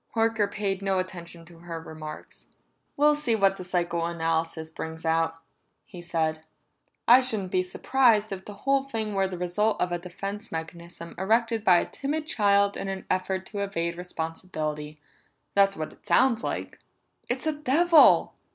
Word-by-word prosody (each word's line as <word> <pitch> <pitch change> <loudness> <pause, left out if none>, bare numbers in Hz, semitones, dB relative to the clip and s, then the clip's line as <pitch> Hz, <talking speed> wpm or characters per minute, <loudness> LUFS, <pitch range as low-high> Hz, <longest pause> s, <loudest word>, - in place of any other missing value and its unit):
Horker 225 -2 +1
paid 200 -2 -2
no 195 -1 0
attention 175 -2 -6
to 170 -1 -16
her 170 -1 -6
remarks. 155 -1 -10 0.5
"We'll 300 +1 +5
see 295 -6 0
what 195 -2 +3
the 185 - -7
psychoanalysis 165 -2 -1
brings 160 0 -7
out," 165 0 +1 0.5
he 180 -3 -11
said. 160 -2 -1 0.6
"I 245 +3 +8
shouldn't 215 -7 +1
be 185 - +2
surprised 215 +3 +2
if 190 -1 -6
the 205 - -9
whole 275 0 +3
thing 225 -6 -3
were 195 -1 +1
the 185 -1 -6
result 200 +5 0
of 180 - 0
a 175 - -1
defense 195 +5 -6
mechanism 170 +1 -7
erected 225 +3 +1
by 180 -5 +6
a - - +1
timid 300 +2 -3
child 200 -6 +3
in 195 - -4
an 195 0 -5
effort 185 0 -1
to 205 - -4
evade 170 -4 -2
responsibility. 160 -3 -5 0.5
That's 195 0 +4
what 155 - -5
it - - -22
sounds 235 -3 +3
like." - - -4 0.5
"It's 250 +4 -1
a 315 - +1
devil!" 300 +3 +5
190 Hz, 160 wpm, -26 LUFS, 170-220 Hz, 0.6 s, I